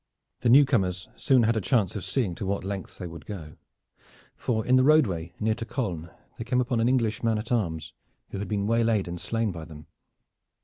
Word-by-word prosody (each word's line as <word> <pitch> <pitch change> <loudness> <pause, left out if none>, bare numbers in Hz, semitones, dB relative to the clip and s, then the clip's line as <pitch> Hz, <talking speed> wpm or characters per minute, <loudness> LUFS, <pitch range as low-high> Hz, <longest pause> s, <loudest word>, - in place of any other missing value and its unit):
The 120 - +1
new 140 +4 +8
comers 95 -8 0
soon 130 -4 +3
had 115 +1 +2
a 110 - 0
chance 105 -3 +1
of 100 - -4
seeing 115 -10 -1
to 90 - -5
what 100 0 -1
lengths 95 0 -5
they 90 - -6
would 85 -2 -9
go, 80 -7 -8 0.8
for 110 -3 -1
in 130 - +4
the 130 - +5
roadway 100 - +3
near 110 0 +1
to 115 +1 -6
Caulnes 90 - -3 0.3
they - - -2
came 125 +2 0
upon 125 -1 0
an 115 +2 +3
English 115 -5 +1
man 115 -2 +1
at 110 +3 -6
arms 80 -8 -1 0.4
who 100 - -4
had 100 - -4
been 100 -2 -1
waylaid 115 -3 +2
and 85 0 -5
slain 115 -2 -1
by 85 -3 -7
them. 75 -2 -11
110 Hz, 215 wpm, -27 LUFS, 90-120 Hz, 0.8 s, new